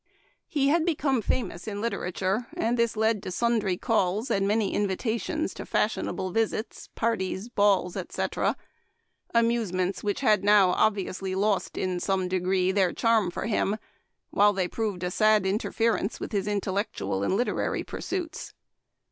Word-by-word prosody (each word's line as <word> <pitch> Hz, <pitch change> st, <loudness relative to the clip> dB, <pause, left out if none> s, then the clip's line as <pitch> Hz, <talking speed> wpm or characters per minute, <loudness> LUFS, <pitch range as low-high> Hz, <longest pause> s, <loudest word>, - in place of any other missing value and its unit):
He 280 Hz, -2 st, +1 dB
had 325 Hz, +2 st, +3 dB
be 335 Hz, -2 st, +1 dB
come 270 Hz, -5 st, +1 dB
famous 215 Hz, -4 st, -2 dB
in 205 Hz, -1 st, -4 dB
literature, 200 Hz, 0 st, -2 dB
and 230 Hz, +2 st, +1 dB
this 235 Hz, -2 st, +1 dB
led 220 Hz, -1 st, +2 dB
to 200 Hz, -, -6 dB
sundry 210 Hz, -2 st, +1 dB
calls, 215 Hz, +1 st, 0 dB
and 195 Hz, 0 st, +2 dB
many 210 Hz, -1 st, +1 dB
invitations 220 Hz, -, -1 dB
to -, -, -7 dB
fashionable 185 Hz, -, -1 dB
visits, 225 Hz, +1 st, -2 dB
parties, 220 Hz, -2 st, -1 dB
balls, 200 Hz, -5 st, +2 dB
etc.; -, -, -1 dB, 0.8 s
amusements 220 Hz, -6 st, +1 dB
which 205 Hz, +3 st, -1 dB
had 215 Hz, -7 st, +3 dB
now 200 Hz, -2 st, +6 dB
obviously 195 Hz, -2 st, 0 dB
lost, 200 Hz, -2 st, 0 dB
in 185 Hz, -1 st, -1 dB
some 190 Hz, 0 st, 0 dB
degree, 185 Hz, 0 st, +1 dB
their 190 Hz, -2 st, +2 dB
charm 225 Hz, -5 st, +2 dB
for 175 Hz, -, -4 dB
him, 215 Hz, -1 st, 0 dB, 0.5 s
while 205 Hz, +1 st, +4 dB
they 190 Hz, -2 st, 0 dB
proved 205 Hz, -3 st, -3 dB
a 180 Hz, -, -1 dB
sad 215 Hz, 0 st, +3 dB
interference 215 Hz, +2 st, 0 dB
with -, -, -5 dB
his 200 Hz, -2 st, -1 dB
intellectual 195 Hz, -, -2 dB
and 185 Hz, -, +1 dB
literary 245 Hz, -, -1 dB
pursuits. 350 Hz, -4 st, -5 dB
205 Hz, 150 wpm, -27 LUFS, 190-230 Hz, 0.8 s, now